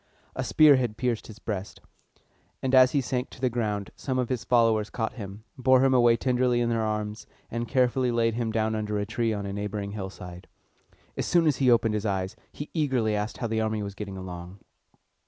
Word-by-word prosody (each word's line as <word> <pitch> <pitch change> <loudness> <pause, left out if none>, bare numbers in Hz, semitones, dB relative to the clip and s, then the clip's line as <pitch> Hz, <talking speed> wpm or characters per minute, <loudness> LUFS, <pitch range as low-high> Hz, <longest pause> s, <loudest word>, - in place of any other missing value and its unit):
A - - -2
spear 150 -3 +6
had 120 -4 -2
pierced 120 -3 -1
his 110 - -11
breast; 105 -4 -5 0.8
and 130 0 -1
as 130 -1 +7
he 140 - +3
sank 125 +1 -2
to - - -14
the 125 -1 +1
ground, 105 -4 -2
some 130 -2 -3
of 125 -2 0
his 125 -4 -2
followers 115 -3 +3
caught 115 -2 -3
him, 100 -2 -8 0.2
bore 130 0 +5
him 135 - +3
away 120 -2 +5
tenderly 125 -1 +1
in 120 -1 +1
their 115 -1 0
arms, 105 0 -3 0.2
and 115 +1 -3
carefully 125 0 +2
laid 115 -1 +1
him 115 -1 -2
down 110 0 0
under 105 -1 -2
a 100 - -1
tree 115 +1 -1
on 100 -2 -3
a 100 - -4
neighboring 100 0 -4
hillside. 95 -3 -8 0.7
As - - -2
soon 170 -2 +3
as 150 -4 +2
he 130 -2 +3
opened 115 -2 +3
his 105 0 -1
eyes, 95 -1 -2 0.2
he 145 - -8
eagerly 130 -9 +1
asked 105 +2 -3
how 120 - -3
the 110 0 0
army 110 -1 -1
was 100 -1 -5
getting 100 -1 -7
along. 90 +1 -8
115 Hz, 210 wpm, -27 LUFS, 105-125 Hz, 0.8 s, as